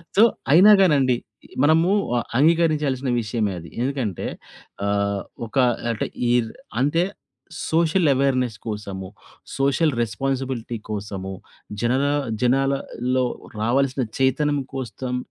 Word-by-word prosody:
So, 210 Hz, -, +7 dB, 0.3 s
అయినా 190 Hz, +7 st, +8 dB
కానండి. 140 Hz, -8 st, +4 dB, 0.5 s
మనము 160 Hz, +4 st, +4 dB, 0.3 s
ఆహ్, 120 Hz, -, -1 dB
అంగీకరించాల్సిన 150 Hz, -5 st, +2 dB
విషయమే 105 Hz, -2 st, -1 dB
అది. 85 Hz, -, -11 dB
ఎందుకంటే 125 Hz, -8 st, -2 dB, 0.6 s
అహ్, 100 Hz, -1 st, 0 dB, 0.3 s
ఒక 135 Hz, -, -7 dB, 0.3 s
అంటే 110 Hz, -, -2 dB, 0.2 s
ఈ -, -, +3 dB, 0.5 s
అంటే 165 Hz, +5 st, +2 dB, 0.7 s
సోషల్ 165 Hz, +1 st, +3 dB
అవేర్నెస్ 130 Hz, -4 st, +1 dB
కోసము, 100 Hz, -3 st, -5 dB, 0.5 s
సోషల్ 140 Hz, +2 st, +2 dB
రెస్పాన్సిబిలిటీ 130 Hz, -1 st, -2 dB
కోసము, 100 Hz, -2 st, -5 dB, 0.5 s
జనన 130 Hz, +4 st, +2 dB, 0.4 s
జనాలలో 130 Hz, -1 st, +1 dB, 0.4 s
రావాల్సిన 130 Hz, +3 st, +1 dB, 0.2 s
చైతన్యం 145 Hz, +2 st, +2 dB
కోస్తం 125 Hz, 0 st, -4 dB
130 Hz, 100 wpm, -23 LUFS, 115-145 Hz, 0.7 s, అయినా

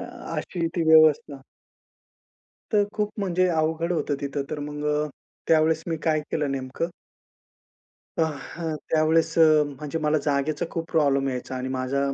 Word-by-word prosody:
अ -, -, -5 dB, 0.3 s
अशी 170 Hz, -3 st, -2 dB
ती 170 Hz, -, +2 dB
व्यवस्था. 155 Hz, -3 st, +5 dB, 1.3 s
तर 205 Hz, -1 st, +4 dB
खूप 210 Hz, -1 st, -1 dB
म्हणजे 185 Hz, -1 st, +1 dB
अवघड 160 Hz, +1 st, 0 dB
होतं 150 Hz, -3 st, -1 dB
तिथं, 140 Hz, 0 st, -2 dB
तर 150 Hz, -, -3 dB
मग 150 Hz, 0 st, -5 dB
अ, 150 Hz, 0 st, 0 dB, 0.4 s
त्यावेळेस 160 Hz, 0 st, +3 dB
मी 165 Hz, -, -1 dB
काय 155 Hz, -1 st, +2 dB
केलं 150 Hz, -3 st, -1 dB
नेमकं. 135 Hz, +5 st, -3 dB, 1.3 s
अ, 165 Hz, -, +2 dB, 0.3 s
हं, 165 Hz, -2 st, -3 dB, 0.2 s
त्यावेळेस 160 Hz, +1 st, +2 dB
अ, 165 Hz, -, +8 dB, 0.2 s
म्हणजे 145 Hz, +3 st, -5 dB
मला 155 Hz, 0 st, +1 dB
जागेचा 145 Hz, +2 st, 0 dB
खूप 165 Hz, 0 st, -5 dB
प्रॉब्लेम 140 Hz, -3 st, +2 dB
यायचा 130 Hz, 0 st, -4 dB
आणि 130 Hz, +1 st, -3 dB
माझा 130 Hz, +1 st, -1 dB
155 Hz, 150 wpm, -25 LUFS, 140-165 Hz, 1.3 s, अ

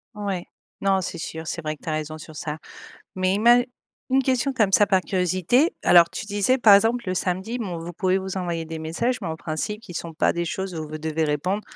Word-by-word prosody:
Ouais. 200 Hz, -4 st, -3 dB, 0.4 s
Non 195 Hz, -1 st, +2 dB
c'est 175 Hz, -, -5 dB
sûr, 160 Hz, 0 st, -6 dB
c'est 170 Hz, -, -3 dB
vrai 155 Hz, 0 st, -2 dB
que -, -, -29 dB
tu 165 Hz, -, -4 dB
as -, -, 0 dB
raison 155 Hz, 0 st, -4 dB
sur 155 Hz, 0 st, -11 dB
ça. 150 Hz, 0 st, -4 dB, 0.6 s
Mais 185 Hz, 0 st, +1 dB
ima 235 Hz, +4 st, +6 dB, 0.5 s
une 265 Hz, +1 st, +3 dB
question, 260 Hz, +1 st, +1 dB
comme 215 Hz, -6 st, +2 dB
ça, 205 Hz, -, +6 dB
par 190 Hz, -1 st, +3 dB
curiosité, 185 Hz, -, +1 dB
alors 170 Hz, -1 st, +7 dB
tu -, -, -6 dB
disais, 205 Hz, +5 st, +1 dB
par 215 Hz, -5 st, +8 dB
exemple, 225 Hz, +4 st, +2 dB
le 185 Hz, -, 0 dB
samedi, 190 Hz, +6 st, -2 dB
bon 195 Hz, -8 st, -4 dB
vous 165 Hz, +1 st, -6 dB
pouvez 185 Hz, +2 st, +1 dB
vous 190 Hz, 0 st, -4 dB
envoyer 170 Hz, -3 st, -2 dB
des 160 Hz, 0 st, -6 dB
messages, 200 Hz, +11 st, -1 dB
mais 185 Hz, -, -4 dB
en 160 Hz, -, -3 dB
principe, 170 Hz, +6 st, -4 dB
qui 180 Hz, -, -11 dB
sont 165 Hz, 0 st, -5 dB
pas 155 Hz, -, +2 dB
des 170 Hz, 0 st, -2 dB
choses 190 Hz, +2 st, -4 dB
où 155 Hz, -1 st, -4 dB
vous 155 Hz, +1 st, -6 dB
devez 160 Hz, +1 st, -1 dB
répondre 180 Hz, +8 st, -1 dB
185 Hz, 235 wpm, -24 LUFS, 160-205 Hz, 0.6 s, par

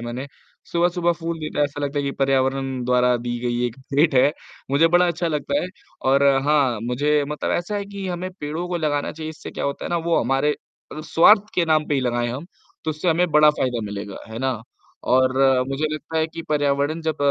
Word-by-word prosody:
है -, -, -7 dB
मैंने। 125 Hz, +4 st, -5 dB, 0.4 s
सुबह-सुबह 175 Hz, 0 st, +2 dB
फूल 165 Hz, 0 st, -4 dB
देता 155 Hz, -1 st, -1 dB
ऐसा 145 Hz, 0 st, -5 dB
लगता 145 Hz, +1 st, -2 dB
है -, -, 0 dB
कि 140 Hz, -, -1 dB
पर्यावरण 135 Hz, -1 st, 0 dB
द्वारा 125 Hz, 0 st, +3 dB
दी 120 Hz, 0 st, -4 dB
गई 120 Hz, 0 st, -1 dB
एक 120 Hz, 0 st, -6 dB, 0.2 s
भेंट 150 Hz, 0 st, +3 dB
है, 130 Hz, +3 st, +5 dB, 0.4 s
मुझे 145 Hz, +4 st, +4 dB
बड़ा 175 Hz, +1 st, +4 dB
अच्छा 170 Hz, 0 st, -1 dB
लगता 160 Hz, -, -1 dB
है। -, -, -2 dB, 0.4 s
और 140 Hz, +1 st, +4 dB, 0.2 s
हाँ 140 Hz, -7 st, +2 dB
मुझे 145 Hz, +5 st, +1 dB
मतलब 150 Hz, -, -3 dB
ऐसा 175 Hz, +4 st, -2 dB
है 200 Hz, -, -3 dB
कि 200 Hz, -1 st, -6 dB
हमें 180 Hz, +1 st, -4 dB
पेड़ों 155 Hz, +4 st, -3 dB
को 175 Hz, -, -1 dB
लगाना 145 Hz, -3 st, -1 dB
चाहिए। 155 Hz, 0 st, -6 dB
इससे 160 Hz, -, -9 dB
क्या -, -, -5 dB
होता 140 Hz, 0 st, -3 dB
है -, -, -3 dB
ना 175 Hz, -, +1 dB
वो 170 Hz, -, +3 dB
हमारे 135 Hz, +3 st, +1 dB, 0.4 s
अ, 155 Hz, -, -6 dB
स्वार्थ 170 Hz, +6 st, +5 dB
के 175 Hz, -, +2 dB
नाम 155 Hz, -1 st, +2 dB
पे 145 Hz, -, +1 dB
ही 135 Hz, -, +1 dB
लगाएँ 120 Hz, -1 st, 0 dB
हम 135 Hz, +7 st, -6 dB, 0.4 s
तो 160 Hz, -, 0 dB
उससे 155 Hz, +4 st, -2 dB
हमें 175 Hz, +2 st, +2 dB
बड़ा 150 Hz, 0 st, +6 dB
फ़ायदा 125 Hz, -5 st, -1 dB
मिलेगा। 100 Hz, 0 st, -6 dB
है 110 Hz, 0 st, -7 dB
ना? 130 Hz, -3 st, -2 dB, 0.4 s
और 130 Hz, 0 st, +3 dB, 0.4 s
मुझे 140 Hz, +3 st, -1 dB
लगता 160 Hz, +1 st, -4 dB
है 160 Hz, -, +2 dB
कि 165 Hz, +1 st, -8 dB
पर्यावरण 145 Hz, +1 st, +1 dB
जब 160 Hz, -1 st, -1 dB
150 Hz, 220 wpm, -22 LUFS, 130-165 Hz, 0.4 s, बड़ा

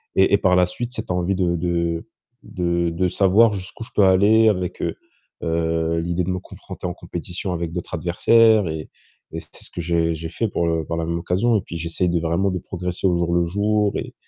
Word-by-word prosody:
et 95 Hz, +1 st, +4 dB
et -, -, +7 dB
par 95 Hz, -2 st, +3 dB
la 90 Hz, 0 st, +5 dB
suite, 120 Hz, +7 st, -5 dB
cette -, -, -5 dB
envie 90 Hz, +2 st, 0 dB
de 90 Hz, -2 st, +1 dB
de 85 Hz, +2 st, -1 dB, 0.4 s
de 85 Hz, -1 st, -1 dB
de 90 Hz, +2 st, 0 dB
savoir 100 Hz, +4 st, +4 dB
jusqu'où 95 Hz, +4 st, -7 dB
je -, -, -10 dB
peux 100 Hz, -, +5 dB
aller 105 Hz, +4 st, +5 dB
avec, 90 Hz, -3 st, -2 dB
heu, -, -, -2 dB, 1.0 s
l'idée 85 Hz, +2 st, -1 dB
de 90 Hz, -, -3 dB
me 90 Hz, -, -2 dB
confronter -, -, -10 dB
en 90 Hz, -, -3 dB
compétition 90 Hz, +2 st, -5 dB
avec 85 Hz, -1 st, -3 dB
d'autres 90 Hz, 0 st, -6 dB
adversaires 105 Hz, +5 st, +4 dB
et 80 Hz, -1 st, -5 dB, 0.4 s
et 80 Hz, -, -3 dB
c'était 80 Hz, -, -14 dB
ce -, -, -5 dB
que 85 Hz, -, -5 dB
j'ai 85 Hz, -1 st, +1 dB
j'ai 80 Hz, +1 st, -6 dB
fait 115 Hz, -, -1 dB
pour 85 Hz, -4 st, -1 dB
le 80 Hz, -1 st, 0 dB
par 85 Hz, -, -3 dB
la 80 Hz, -, -1 dB
même 85 Hz, +1 st, -2 dB
occasion. 95 Hz, +7 st, +1 dB
Et -, -, -1 dB
puis, 85 Hz, -, -7 dB
j'essaye 85 Hz, +2 st, -1 dB
de 85 Hz, -, +1 dB
vraiment 85 Hz, +4 st, 0 dB
de 90 Hz, -1 st, -2 dB
progresser 90 Hz, +1 st, -3 dB
au 90 Hz, -, +2 dB
jour 85 Hz, 0 st, 0 dB
le 85 Hz, -, +3 dB
jour 105 Hz, +3 st, +1 dB
et -, -, -6 dB
90 Hz, 225 wpm, -22 LUFS, 85-95 Hz, 1.0 s, et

